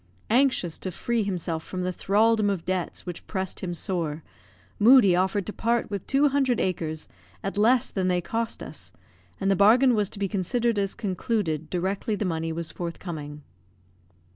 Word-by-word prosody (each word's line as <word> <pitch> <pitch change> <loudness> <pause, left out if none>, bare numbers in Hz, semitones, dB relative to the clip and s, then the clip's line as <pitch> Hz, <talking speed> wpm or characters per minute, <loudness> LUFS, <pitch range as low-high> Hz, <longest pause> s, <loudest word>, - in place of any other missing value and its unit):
Anxious 245 - +2
to 185 - -4
free 230 +6 -1
himself 175 -5 -2
from 185 -1 -5
the 185 - -1
thraldom 215 +3 +2
of 190 -4 -2
debts 185 -1 -3
which 175 -2 -7
pressed 190 -2 -3
him 175 -2 -4
sore, 165 -4 -2 0.6
Moodie 220 -4 +7
offered 190 +2 +1
to 210 - -5
part 235 -1 0
with 200 -3 -4
two 285 +2 +3
hundred 270 -3 +1
acres 160 -4 -2 0.4
at 195 - -3
less 230 +4 +4
than 190 -2 -2
they 180 -1 +2
cost 225 +6 -3
us, - - -8 0.5
and 195 0 +1
the - - +4
bargain 240 +7 +5
was 210 -3 +1
to - - -6
be 200 0 -1
considered 220 +4 0
as 195 -1 -1
concluded 185 -6 -2
directly 190 +4 -1
the 205 - -2
money 165 -2 -2
was 165 0 -3
forthcoming. 160 -4 -6
195 Hz, 170 wpm, -26 LUFS, 175-225 Hz, 0.6 s, Moodie